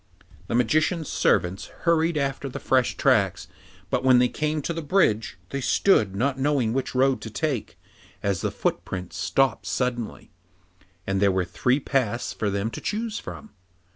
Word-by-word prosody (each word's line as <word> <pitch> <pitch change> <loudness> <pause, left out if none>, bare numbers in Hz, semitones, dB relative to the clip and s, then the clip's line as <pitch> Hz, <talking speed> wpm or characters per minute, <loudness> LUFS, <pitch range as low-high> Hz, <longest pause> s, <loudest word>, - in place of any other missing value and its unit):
The - - -1
Magician's 155 +6 +1
servants 90 +3 +1 0.2
hurried 165 -1 +2
after 140 -1 -2
the - - -6
fresh 130 -2 +1
tracks, 105 -10 +2 0.4
but 130 - 0
when 130 -1 +6
they 125 0 +4
came 155 -1 -2
to 170 - -2
the 165 - -4
bridge, 140 - +1
they 140 - -2
stood, 110 - +3
not 135 +5 0
knowing 135 -5 +1
which 135 0 -2
road 135 +1 +3
to 110 - -6
take, 135 +1 -3 0.5
as 100 -3 0
the - - 0
footprints 90 -1 -3
stopped 120 -7 +1
suddenly, 120 +2 -3 0.7
and 95 0 -1
there 100 -1 +4
were 95 -1 0
three 125 +9 +1
paths 125 -5 -1
for 105 - -1
them 100 +3 -2
to - - -7
choose 220 +1 -2
from. 220 - -9
130 Hz, 165 wpm, -25 LUFS, 105-150 Hz, 0.7 s, when